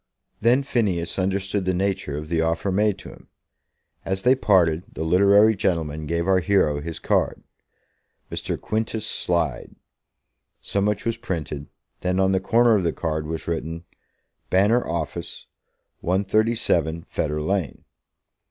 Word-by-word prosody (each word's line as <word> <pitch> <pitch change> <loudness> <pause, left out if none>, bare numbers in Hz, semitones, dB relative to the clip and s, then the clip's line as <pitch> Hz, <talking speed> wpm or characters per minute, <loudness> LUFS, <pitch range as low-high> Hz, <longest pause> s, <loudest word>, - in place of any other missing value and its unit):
Then 120 +5 +4
Phineas 95 -10 -1
understood 95 +1 -1
the 95 0 +1
nature 95 -6 -1
of 75 +1 -6
the 80 0 0
offer 85 +4 0
made 105 +1 +2
to - - -11
him. - - -15 0.8
As 95 0 -2
they 125 +1 +6
parted, 90 -9 +3
the - - -5
literary 100 +6 +5
gentleman 80 -5 -1
gave 85 +2 -1
our 95 -1 +4
hero 80 -5 +2
his 80 +2 -5
card. - - 0 0.9
"Mr. - - -3
Quintus 110 0 -2
Slide." 80 -7 -1 0.8
So 100 - -2
much 105 0 0
was 115 -1 -1
printed. 75 -5 -4 0.3
Then, 90 +1 0
on 95 0 +3
the 95 - +2
corner 115 +4 +4
of 100 - +2
the 85 - 0
card 80 -2 -3
was 80 0 -5
written, 80 0 -3 0.7
"Banner 105 +6 +3
Office, 85 0 -4 0.5
137, 95 -4 +1
Fetter 75 0 -2
Lane." 90 -1 -2
95 Hz, 140 wpm, -23 LUFS, 80-100 Hz, 0.9 s, they